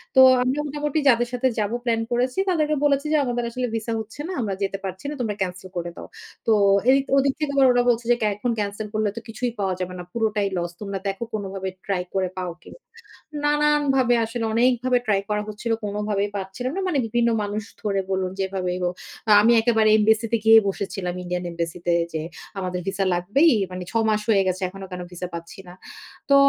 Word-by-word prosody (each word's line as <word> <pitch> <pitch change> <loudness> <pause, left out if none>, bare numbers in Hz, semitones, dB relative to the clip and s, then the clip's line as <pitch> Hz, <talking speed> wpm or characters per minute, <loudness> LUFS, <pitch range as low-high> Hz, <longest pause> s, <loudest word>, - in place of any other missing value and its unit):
তো - - +7 0.2
আমরা 260 +3 0
মোটামুটি 295 +1 -1
যাদের 240 -1 +3
সাথে 250 +1 +1
যাব 210 0 0
প্ল্যান 230 -2 +1
করেছি। 250 +5 0
তাদেরকে 305 -4 +1
বলেছি 280 0 +2
যে, - - +5
আমাদের 245 -1 -1
আসলে 250 +1 -2
ভিসা 225 +1 -2
হচ্ছে 220 +4 -9
না। 375 - -4
আমরা 205 -4 -2
যেতে 195 0 -1
পারছি 190 +5 -6
না। - - -4
তোমরা 215 -4 -1
ক্যানসেল 185 0 -3
করে 175 0 -3
দাও। - - -9 0.4
তো 225 - +5 0.4
এই 270 - +6 0.2
ওদিক 275 0 +3
থেকে 300 -2 -1
তো - - +6
ওরা 245 0 +3
বলছে 235 0 +1
যে - - +6 0.2
এখন 235 +4 -1
ক্যানসেল 205 +1 -3
করলে 215 -1 +1
তো - - -4
কিছুই 235 +2 -3
পাওয়া 190 -2 0
যাবে 185 0 -3
না। 180 - -5
পুরোটাই 215 -3 0
লস। 175 0 -2
তোমরা 200 -1 -3
দেখো 195 +3 -3
কোনভাবে 195 -2 -3 0.2
ট্রাই 190 -3 -1
করে 190 -1 0
পাও 180 -1 -3
কি - - -14
না। - - -16 0.7
নানানভাবে 295 -4 +3
আসলে 230 +1 -3
অনেকভাবে 250 +1 +3
ট্রাই 200 -2 +2
করা 210 0 0
হচ্ছিল। 215 +2 -4
কোনভাবেই 205 0 -1
পাচ্ছিলাম 200 +6 -4
না। - - 0
মানে 345 -5 0
বিভিন্ন 235 +1 +2
মানুষ 205 +1 -3 0.2
ধরে 200 -2 0
বলুন 190 -1 0
যেভাবেই 190 -2 -2
হোক। 175 0 0 0.5
আমি 225 +3 +5
একেবারে 220 -2 +3
এমবাসিতে 220 +2 +2
গিয়ে 225 0 +9
বসেছিলাম 195 -2 -3
ইন্ডিয়ান 180 0 -3
এমবাসিতে 170 +1 -2 0.2
যে 160 - -2 0.4
আমাদের 180 -1 -3
ভিসা 195 0 0
লাগবেই, 210 - +3 0.2
মানে 180 0 -5
৬ 230 - +1
মাস 215 0 +1
হয়ে 200 -3 +4
গেছে। 185 +1 -1
এখনো 195 +1 -9
কেন 180 0 -5
ভিসা 180 0 -5
পাচ্ছি 170 +3 -8
না। 175 - -10 0.6
তো 280 - +6
215 Hz, 200 wpm, -23 LUFS, 190-245 Hz, 0.7 s, গিয়ে